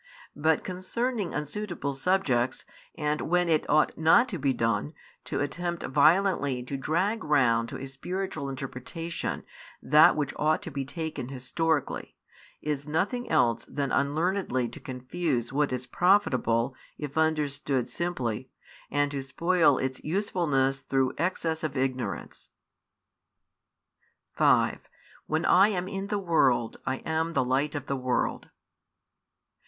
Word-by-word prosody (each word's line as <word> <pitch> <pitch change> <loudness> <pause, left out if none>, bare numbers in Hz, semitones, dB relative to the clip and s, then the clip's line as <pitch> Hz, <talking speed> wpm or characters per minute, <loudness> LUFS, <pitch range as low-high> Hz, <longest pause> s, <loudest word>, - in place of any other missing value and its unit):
But 155 +2 +2
concerning 200 +3 -2
unsuitable 150 0 -3
subjects, 135 -5 +1 0.3
and 150 -1 -1
when 180 +1 +1
it 160 -2 +1
ought 155 +1 +3
not 235 +11 +5
to 185 -7 -4
be 140 -1 +2
done, 115 +4 -1 0.3
to - - -2
attempt 170 +4 -3
violently 150 -3 +3
to 130 +3 -5
drag 180 +11 0
round 120 -6 +3
to - - -6
a 135 - -5
spiritual 155 +2 -4
interpretation 135 +5 -5 0.4
that 150 +3 +6
which 145 -3 -1
ought 155 +1 +1
to 170 - -6
be 135 -1 -3
taken 160 -3 -5
historically, 140 +3 -2 0.5
is 145 -1 -2
nothing 200 +11 -1
else 115 -1 +2
than 140 -2 -3
unlearnedly 145 -3 0
to - - -11
confuse 130 -1 -3
what 145 0 +1
is 125 0 -3
profitable 130 - +2 0.2
if 145 -1 -6
understood 145 -5 0
simply, 130 -9 -3 0.4
and 145 0 +1
to 140 -1 -3
spoil 160 +1 +3
its 130 0 -3
usefulness 155 -7 0
through 135 -1 0
excess 165 -2 -1
of 150 -3 -2
ignorance. 130 -7 -3 1.8
5 - - +3 0.5
When 155 +2 0
I 195 +3 +6
am 185 -4 -2
in 195 0 -4
the 205 0 -1
world, 140 - +2
I 130 - -2
am 160 +1 -1
the 130 -5 +2
Light 140 +4 0
of 145 - -4
the 140 - -2
world. 130 -1 -1
150 Hz, 130 wpm, -28 LUFS, 130-175 Hz, 1.8 s, that